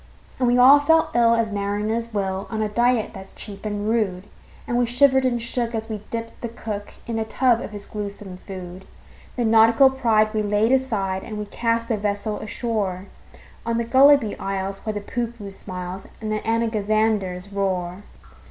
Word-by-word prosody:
And 250 - +2
we 245 +1 +3
all 265 +4 +8
felt 320 +3 +3
ill 230 -1 +5
as 230 -2 0
mariners 210 +3 -2
will, 195 -2 -2
On 220 - -3
a 215 - +1
diet 235 +1 +1
that's 190 0 -11
cheap 205 0 -7
and 205 0 -3
rude; 210 -5 0 0.4
And 240 - -1
we 245 - +2
shivered 265 +2 +4
and 240 -2 +1
shook 235 0 -2
as 225 0 -4
we 215 -2 -4
dipped 230 0 -6
the 235 - -3
cook 215 -3 -6
In 230 -1 -3
a - - 0
tub 240 +1 +2
of - - -5
his 205 -1 -8
gluesome 200 -2 -6
food. 185 -1 -9 0.5
Then 235 -3 +1
nautical 225 +4 +6
pride 225 -5 +2
we 215 - +1
laid 210 +2 +1
aside, 210 -8 0
And 215 - -6
we 210 - -4
cast 230 +2 -1
the 225 - 0
vessel 205 +1 -2
ashore 205 -5 -3 0.6
On 230 0 -1
the 235 - -1
Gulliby 265 -1 +5
Isles, 195 0 -3
where 215 - 0
the 205 - -4
Poohpooh 230 -2 -5
smiles, 185 -1 -6
And 215 -1 -4
the 215 - 0
Anagazanders 215 -4 0
roar. 185 -2 -1
215 Hz, 180 wpm, -23 LUFS, 200-235 Hz, 0.6 s, all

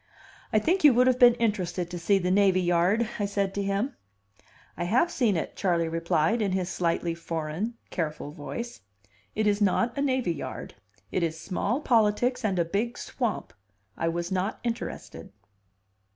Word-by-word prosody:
"I - - +3
think 335 - +2
you 290 -5 +7
would 250 +1 +5
have 255 -1 +3
been 240 -1 +8
interested 185 -6 -1
to 175 - -4
see 195 +4 +3
the 180 -1 0
navy 190 -1 +4
yard," 180 +6 +2
I 205 - 0
said 200 -1 -1
to 200 - -2
him. 200 +7 -1 0.8
"I 175 - -3
have 255 - +2
seen 220 - +2
it," - - -4
Charley 170 -4 +1
replied, 165 +6 +1
in 200 -3 0
his 185 -1 -1
slightly 170 -1 0
foreign, 165 +6 -4 0.2
careful 155 -3 -3
voice. 235 +10 -6 0.6
"It 215 - +1
is 205 0 +2
not 230 +4 +2
a 280 - -1
navy 260 -10 +1
yard. - - -7 0.4
It 185 - 0
is 160 -1 -1
small 205 - -1
politics 235 0 +2
and 195 -4 0
a 170 - +2
big 215 +8 -2
swamp. 240 -5 -3 0.4
I 165 - -1
was 170 +1 -2
not 190 +2 -1
interested." 235 -1 -5
200 Hz, 170 wpm, -27 LUFS, 175-235 Hz, 0.8 s, been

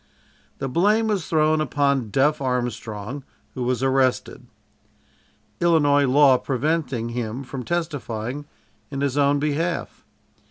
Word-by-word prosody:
The 135 - -3
blame 205 - +2
was 195 -6 -1
thrown 155 -1 +2
upon 140 -4 0
"Duff" 140 +6 +2
Armstrong, 125 -1 -3 0.3
who 130 - -6
was 125 +1 -1
arrested. 130 -1 0 1.1
Illinois 145 -5 +3
law 135 -1 +5
preventing 135 -3 -1
him 120 +2 -4
from 135 0 -6
testifying 145 -5 -3 0.4
in 140 -2 -4
his 140 -2 0
own 145 0 +3
behalf. 150 +4 -2
140 Hz, 115 wpm, -23 LUFS, 125-155 Hz, 1.1 s, law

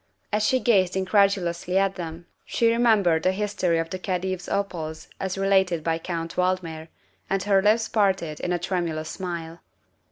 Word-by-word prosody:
As 210 - +2
she 255 +4 +3
gazed 190 -8 +3
incredulously 190 -2 +1
at 195 0 +2
them 170 -2 -7 0.2
she 230 -1 +2
remembered 215 -9 +3
the 185 - +2
history 190 -4 0
of 165 0 -2
the 185 - -4
Khedive's 185 -1 -3
opals 170 -6 -3
as 190 0 -3
related 190 -4 +2
by 165 0 0
Count 165 -1 -4
Valdmir, 180 -3 -1 0.4
and 195 -1 0
her 195 -1 +3
lips 220 +3 +3
parted 190 -7 0
in 180 - -2
a 175 - +2
tremulous 170 -3 -2
smile. 170 -3 -5
185 Hz, 160 wpm, -25 LUFS, 170-195 Hz, 0.4 s, she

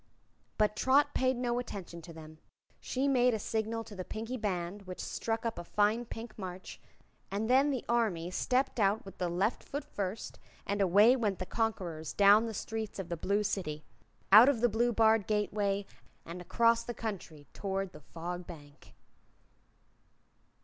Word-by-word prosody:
But 210 0 +2
Trot 265 +6 +3
paid 260 0 +2
no 245 -1 0
attention 190 -8 -7
to 170 - -11
them. 155 -1 -12 0.4
She 265 +2 -1
made 250 -3 +3
a - - -1
signal 225 +1 -2
to 225 - -12
the 185 - -5
Pinkie 225 +6 -5
Band, 195 -3 -3
which 185 - -7
struck 225 0 -3
up 225 -6 -2
a - - -6
fine 210 +6 +1
Pink 225 -1 -8
March, 185 -1 -7 0.5
and 205 +3 -2
then 265 +4 +4
the 260 -4 -2
Army 205 -8 0
stepped 255 +6 0
out 205 +1 +2
with 195 - -12
the 180 -1 0
left 190 +7 0
foot 285 +1 -6
first, 205 -6 -5 0.3
and 200 0 -1
away 205 +6 +6
went 210 -7 -1
the 185 - -4
conquerors 180 -8 -2
down 205 +3 +6
the 225 - -5
streets 220 0 -4
of 195 -3 -5
the 170 - -2
Blue 200 +5 0
City, 155 -7 -3 0.5
out 220 +6 +10
of 250 -6 0
the 240 - +4
blue 235 +3 +1
barred 220 -2 +3
gateway 205 -1 0 0.4
and 170 +2 -7
across 230 +5 +2
the 240 0 -6
country 175 -9 -6
toward 195 -1 -3
the 155 - -13
Fog 175 +3 -6
Bank. 145 -4 -13
210 Hz, 170 wpm, -31 LUFS, 185-230 Hz, 0.5 s, out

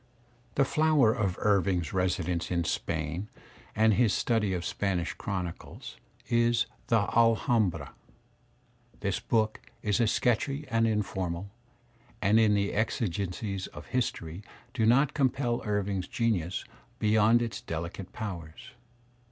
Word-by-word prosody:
The 140 - +4
flower 150 -6 +4
of 100 -7 -1
Irving's 95 -5 +1
residence 90 -2 0
in 85 -1 0
Spain 80 +4 -2 0.5
and 110 0 +4
his 110 0 +3
study 110 -4 +1
of 90 -2 -2
Spanish 95 -4 -1
chronicle 90 -4 -5 0.5
is 120 0 +3 0.2
"The 115 -2 +4
Alhambra." 115 -3 +2 1.1
This - - -1
book 110 -2 0 0.2
is 105 +3 +1
sketchy 130 +5 0
and 115 0 +2
informal, 95 -3 -2 0.7
and 105 +2 +4
in 110 -2 +4
it - - +3
the 100 0 0
exigencies 100 -2 -2
of - - -11
history 100 -8 -2 0.3
do 110 -4 +1
not 135 +5 +4
compel 130 -3 +1
Irving's 100 -3 -1
genius 100 -7 -1 0.3
beyond 110 +2 +4
its 110 -3 -4
delicate 85 +3 -5
powers. 85 - -7
105 Hz, 120 wpm, -29 LUFS, 90-115 Hz, 1.1 s, The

